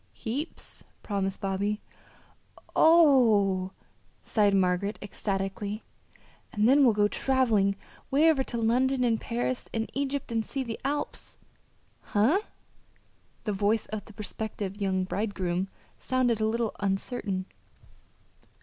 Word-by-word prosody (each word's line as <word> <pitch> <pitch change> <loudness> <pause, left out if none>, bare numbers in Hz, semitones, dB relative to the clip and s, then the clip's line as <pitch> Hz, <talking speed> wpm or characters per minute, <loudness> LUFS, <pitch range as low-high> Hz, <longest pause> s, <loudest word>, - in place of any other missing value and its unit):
"Heaps!" 270 +8 -5 0.2
promised 195 -2 -2
Bobby. 200 +1 -1 1.0
"Oh 235 - +5
h!" - - -15 0.6
sighed 205 -2 +3
Margaret 190 +2 +1
ecstatically. 200 +1 -3 0.7
"And 210 +1 +2
then 280 +3 +6
we'll 235 -5 +5
go 205 0 +4
traveling 220 -6 +2 0.3
'way 295 +4 +4
over 270 -4 +1
to 235 - -4
London 250 +3 +2
and 230 -2 +1
Paris 245 +2 -2
and 225 -1 -3
Egypt 275 -2 -2
and 225 -1 0
see 270 +4 -3
the 230 -3 -5
Alps." 290 +2 -3 0.6
"Huh?" 230 - +2 1.0
The 210 - -1
voice 205 +2 +1
of 215 - -4
the 215 - -13
prospective 210 -1 -5
young 190 -1 +1
bridegroom 190 -2 -2 0.3
sounded 245 -4 +1
a 215 - +3
little 230 0 -1
uncertain. 195 -1 -2
215 Hz, 120 wpm, -28 LUFS, 200-250 Hz, 1.0 s, then